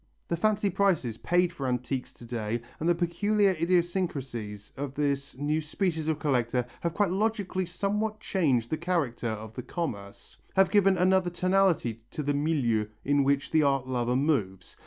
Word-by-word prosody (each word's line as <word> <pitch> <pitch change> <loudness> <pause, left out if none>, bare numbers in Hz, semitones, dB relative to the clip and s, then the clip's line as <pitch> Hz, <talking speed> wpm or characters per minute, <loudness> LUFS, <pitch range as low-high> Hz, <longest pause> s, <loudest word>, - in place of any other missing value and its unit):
The 170 - +1
fancy 205 +2 +1
prices 170 - +1
paid 175 0 +2
for 140 -6 -4
antiques 125 +1 -2
to 120 - -12
day 115 -1 -3 0.2
and 165 - 0
the 175 - +4
peculiar 200 +4 +2
idiosyncrasies 160 - -1
of 140 0 -5
this 140 -2 -1
new 150 +3 0
species 160 0 -2
of 160 -2 +1
collector 125 -5 0
have 170 -1 -2
quite 200 -4 +2
logically 200 -2 -1
somewhat 210 +4 -1
changed 140 - +1
the 155 - +1
character 155 -9 -1
of 110 0 -6
the 125 - -5
commerce, 100 - -6 0.2
have 195 0 +4
given 195 -2 +4
another 185 0 +3
tonality 175 - +1
to 150 - -4
the 145 +1 0
milieu 140 -8 +1 0.2
in 145 0 +3
which 140 +1 +1
the 160 - +4
art 135 -3 +1
lover 125 -1 0
moves. 120 - 0
155 Hz, 165 wpm, -28 LUFS, 125-185 Hz, 0.2 s, the